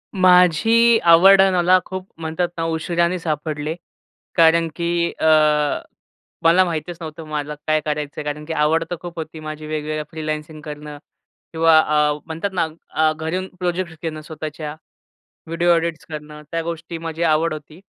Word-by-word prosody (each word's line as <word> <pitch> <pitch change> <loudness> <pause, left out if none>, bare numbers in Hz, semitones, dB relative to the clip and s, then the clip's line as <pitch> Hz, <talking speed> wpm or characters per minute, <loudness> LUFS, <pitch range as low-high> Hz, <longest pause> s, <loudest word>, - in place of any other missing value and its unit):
माझी 185 +6 +5
आवड 190 +4 +8
मला 180 +1 +5
खूप 185 0 -6
म्हणतात 160 +2 -1
ना 165 - -1
उशीराने 170 +2 0
सापडले. 155 -1 -3 0.6
कारण 165 0 +5
की 170 0 0
अ, - - 0 1.2
मला 170 +3 +6
माहीतच 170 0 -4
नव्हतं 160 0 -7
मला 150 -1 -4
काय 155 0 +3
करायचं 150 -1 -3
आहे? - - -4
कारण 150 +1 -5
की 160 - -4
आवड 160 +2 +2
तर 175 - -2
खूप 175 -2 -8
होती 160 0 -7
माझी 155 0 -7
वेगवेगळ्या 155 0 -3
फ्रीलान्सिंग 155 -1 -5
करणं 150 -1 -8 0.6
किंवा 165 0 +5
अ, 150 -1 +2
म्हणतात 165 +5 -4
ना 170 -3 +1 0.2
अ, 155 0 +2
घरून 165 +4 -3
प्रोजेक्ट्स 175 -1 -2
घेणं 155 -2 -4
स्वतःच्या 155 -1 -7 0.7
व्हिडिओ 170 +2 +1
ऑडिट्स 165 -1 -1
करणं, 150 -1 -8
त्या 165 - -1
गोष्टी 165 0 -5
माझी 165 0 -4
आवड 160 0 +2
होती. 155 +2 -10
160 Hz, 150 wpm, -21 LUFS, 155-170 Hz, 1.2 s, आवड